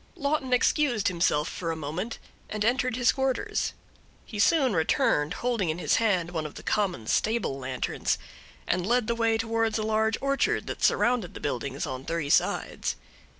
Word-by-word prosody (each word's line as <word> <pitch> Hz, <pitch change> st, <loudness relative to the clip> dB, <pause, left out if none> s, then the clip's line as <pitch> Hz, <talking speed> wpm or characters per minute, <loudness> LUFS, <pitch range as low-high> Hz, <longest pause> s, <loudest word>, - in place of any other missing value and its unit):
Lawton 280 Hz, -2 st, -1 dB
excused 250 Hz, -4 st, +2 dB
himself 170 Hz, -3 st, +1 dB
for 170 Hz, -, -4 dB
a -, -, -2 dB
moment, 160 Hz, +9 st, -4 dB, 0.3 s
and 215 Hz, 0 st, -2 dB
entered 250 Hz, +1 st, +1 dB
his 245 Hz, 0 st, +4 dB
quarters. 265 Hz, -1 st, -1 dB, 0.5 s
He 210 Hz, -, -7 dB
soon 265 Hz, +1 st, +4 dB
returned, 160 Hz, -2 st, +2 dB
holding 235 Hz, -8 st, -1 dB
in 155 Hz, -, -1 dB
his 180 Hz, -, +2 dB
hand 185 Hz, -7 st, +1 dB
one 160 Hz, -3 st, -2 dB
of 150 Hz, -, -13 dB
the -, -, -9 dB
common, 190 Hz, -, 0 dB
stable 210 Hz, -, 0 dB
lanterns, 130 Hz, -1 st, -1 dB, 0.5 s
and 180 Hz, -, 0 dB
led 245 Hz, 0 st, +2 dB
the 235 Hz, -, 0 dB
way 225 Hz, -1 st, +2 dB
towards 225 Hz, 0 st, 0 dB
a 215 Hz, -, -1 dB
large 220 Hz, +1 st, +1 dB
orchard 275 Hz, 0 st, +1 dB
that -, -, -6 dB
surrounded 240 Hz, -7 st, +2 dB
the -, -, -6 dB
buildings 135 Hz, +1 st, -3 dB
on 130 Hz, -3 st, -5 dB
three 165 Hz, -2 st, -2 dB
sides. -, -, +1 dB
215 Hz, 170 wpm, -27 LUFS, 160-240 Hz, 0.5 s, his